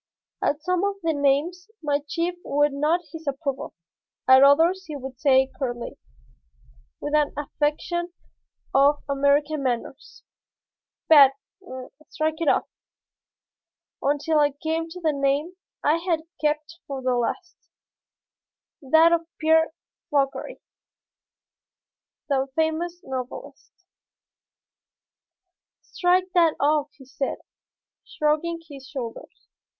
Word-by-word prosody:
At 295 +2 0
some 365 +1 0
of 400 0 0
the 325 -1 +1
names 300 +7 0
my 290 -1 +1
chief 340 +3 -1
would 290 0 +1
nod 305 +5 +1
his 325 -2 -9
approval, 275 -1 -3 0.5
at 260 0 +8
others 330 +7 +4
he 305 - -6
would 265 -2 -8
say 265 -2 +4
curtly, 240 -3 -4 1.0
with 295 - -5
an 300 -1 +3
affectation 305 +4 -2 0.6
of 280 +2 +4
American 285 +2 +2
manners, 260 +2 -4 0.8
"Bad; 280 -4 +8 0.8
strike 315 +1 -2
it 330 - 0
off," - - +2 1.3
until 295 +2 +1
I 290 -1 +3
came 320 +3 -3
to 360 +2 -9
the 315 -3 +1
name 280 +4 0 0.3
I 305 +3 +3
had 335 -2 -1 0.2
kept 305 +3 -1
for 270 -2 -5
the 255 0 +1
last, 335 +9 -3 1.2
that 320 +4 +5
of 335 -1 +1
Pierre 320 +1 +3 0.4
Fauchery, 280 - -1 1.6
the 270 -2 +1
famous 325 +2 -1
novelist. 260 -1 -7 2.1
"Strike 365 +1 +1
that 335 -3 +4
off," 295 0 +2
he 265 - -16
said, 270 +1 -3 0.7
shrugging 310 +3 -1
his 275 -3 -11
shoulders. 255 -5 -8
300 Hz, 110 wpm, -24 LUFS, 275-330 Hz, 2.1 s, at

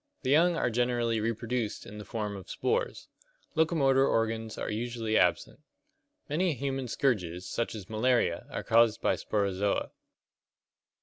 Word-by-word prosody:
The 130 - 0
young 170 +4 +5
are 145 - 0
generally 120 -1 +1
reproduced 115 0 -2
in 105 - -9
the 105 - -8
form 105 -3 -3
of 95 - -10
spores. 470 +1 -1 0.5
Locomotor 140 -5 +3
organs 115 -1 -1
usually 115 0 -2
absent. - - +2 0.7
Many 165 +2 +1
human 135 0 -3
scourges, 95 -9 -1
such 115 -1 -2
as 100 -4 -8
malaria, 115 -2 +1
are - - -4
caused 115 -1 +4
by - - +2
Sporozoa. 100 -1 -1
115 Hz, 130 wpm, -29 LUFS, 110-135 Hz, 0.7 s, young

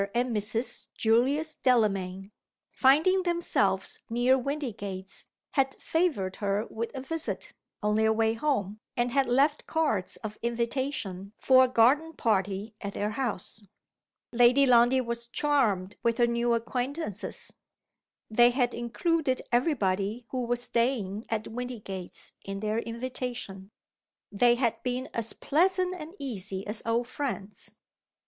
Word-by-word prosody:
and 240 -1 +1
Mrs. 220 +4 0
Julius 270 +8 +2
Delamayn, 195 -5 +1 0.4
finding 315 +8 +4
themselves 345 -1 0
near 245 +3 +3
Windygates, 225 -9 -4 0.2
had 270 -2 +1
favored 290 - 0
her 205 +1 0
with 230 +1 -3
a 265 - -4
visit, 320 +4 -3 0.3
on 210 0 +2
their 220 0 +3
way 220 0 +2
home, 220 -6 -1 0.2
and 240 0 +1
had 275 0 +2
left 280 +5 +2
cards 290 - 0
of 215 -1 -6
invitation 235 -5 -2
for 260 -1 +6
a - - +4
garden 265 +7 +3
party 205 - 0
at 200 -1 -5
their 210 +1 -1
house. 220 -3 -3 0.7
Lady 245 +3 +5
Lundie 245 +1 +5
was 235 -1 -4
charmed 230 -9 +1
with 230 -1 +1
her 240 - +5
new 235 0 +1
acquaintances. 245 - -4 0.7
They 240 +2 +5
had 245 -1 +1
included 260 +4 0
every 250 +6 +3
body 200 +2 -1
who 255 -2 -2
was 245 0 -1
staying 230 -4 -1
at 220 -1 -2
Windygates 220 -6 -6
in 195 0 -5
their 215 +1 0
invitation. 235 -5 -5 0.6
They 240 +4 +4
had 240 -2 0
been 255 +1 -3
as 230 -1 -3
pleasant 365 +4 +2
and 330 0 -8
easy 200 -7 -4
as 210 +1 -2
old 235 +1 +1
friends. 215 -7 -5
235 Hz, 130 wpm, -28 LUFS, 210-265 Hz, 0.7 s, for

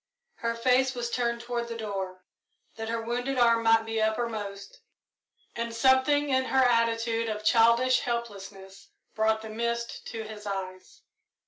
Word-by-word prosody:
Her 230 0 -2
face 255 +2 +2
was 240 -1 -3
turned 235 -1 -1
toward 235 0 -3
the 230 -1 -6
door, 190 -4 -5 0.5
that 225 0 -5
her 230 0 -2
wounded 245 +3 -2
arm 235 -1 +4
might 225 0 +4
be 225 0 -2
uppermost, 215 -3 -3 0.8
and 235 0 -4
something 265 +4 +3
in 260 -1 +2
her 265 0 +3
attitude 230 -1 +1
of 210 0 -4
childish 235 +3 +4
helplessness 200 -5 -6 0.3
brought 220 0 +1
the 220 - -7
mist 235 +1 -3
to 225 -1 -5
his 215 -1 -9
eyes. 195 - -6
230 Hz, 145 wpm, -28 LUFS, 220-240 Hz, 0.8 s, arm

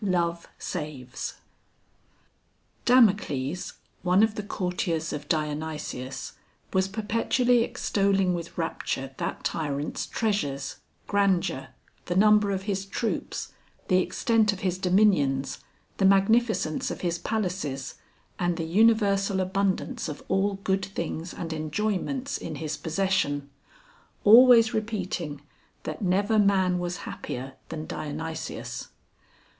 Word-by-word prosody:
THE 200 - 0
MAN 170 -1 +2 0.2
CUMMINS 145 -7 -5 1.5
Damocles, 185 - +3 0.3
one 185 +3 +4
of 220 -1 +3
the 210 - -4
courtiers 180 -4 -2
of 145 0 -6
Dionysius, 150 -4 -3 0.4
was 190 0 +3
perpetually 230 +4 +2
extolling 195 -4 +1
with 170 -1 -5
rapture 135 -5 -2
that - - -3
tyrant's 145 -2 -2
treasures, 145 -12 -1 0.3
grandeur, 195 -9 +1 0.4
the 175 - -2
number 210 +1 +5
of 195 -1 -1
his 195 -1 -2
troops, 225 +3 -3 0.4
the 185 -1 +5
extent 215 +4 +2
of 195 - -7
his 185 -1 -1
dominions, 180 -9 +2 0.4
the 195 - +2
magnificence 195 -3 +3
of - - -5
his 170 -1 -1
palaces, 180 - -2 0.5
and 175 -1 0
the 165 - -2
universal 200 0 +3
abundance 195 +6 -1
of 150 - -7
all 195 +1 +1
good 190 0 +1
things 170 -2 -4
and 165 -2 -5
enjoyments 210 - -2
in - - -5
his 155 -1 -3
possession; 160 -5 0 0.7
always 230 +1 +8
repeating, 185 -9 -3 0.4
that - - -5
never 200 +3 +2
man 190 -3 +3
was 175 0 -3
happier 130 +2 -6 0.2
than 155 -1 -5
Dionysius. 160 +2 -5
185 Hz, 115 wpm, -27 LUFS, 155-205 Hz, 1.5 s, always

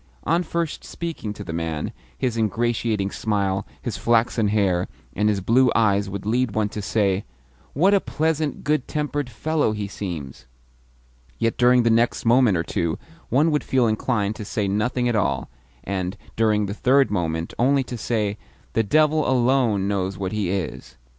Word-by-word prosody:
On 170 +3 +2
first 170 -2 -3
speaking 165 -11 -5
to - - -8
the 80 - -6
man, 80 -2 -3 0.3
his 125 -3 -1
ingratiating 110 -2 0
smile, 100 -3 -1 0.2
his - - -3
flaxen 115 -1 +2
hair, 95 -4 +1 0.3
and 105 +2 +2
his 100 -2 0
blue 120 +5 +4
eyes 100 -3 +2
would 100 0 -6
lead 120 +1 0
one 110 -1 +1
to 105 - -5
say, 100 -1 +1 0.5
"What 185 +8 +4
a 200 - +5
pleasant, 155 -1 -1
good 150 -3 0
tempered 145 -3 -2
fellow 145 +1 0
he 105 -1 -3
seems!" 80 -11 -6 0.9
yet 115 0 0
during 125 0 +4
the 115 - +3
next 115 +2 +2
moment 115 -4 +4
or 80 - 0
two 85 -1 -1 0.3
one 150 +6 +3
would 150 - +1
feel 130 -2 +2
inclined 110 -1 0
to 110 - -6
say 105 0 -2
nothing 120 +5 0
at 120 - +1
all, 70 - 0 0.3
and, 95 0 -3 0.2
during 105 -2 +2
the 100 - -4
third 130 +1 +3
moment, 80 -4 -2
only 135 +3 +3
to 125 - -6
say, 105 -3 -1 0.3
"The 115 - +3
devil 155 +5 +3
alone 120 -6 +2
knows 95 -1 -1
what 95 -1 -3
he 105 -4 -1
is!" 95 -3 -4
110 Hz, 170 wpm, -23 LUFS, 100-125 Hz, 0.9 s, a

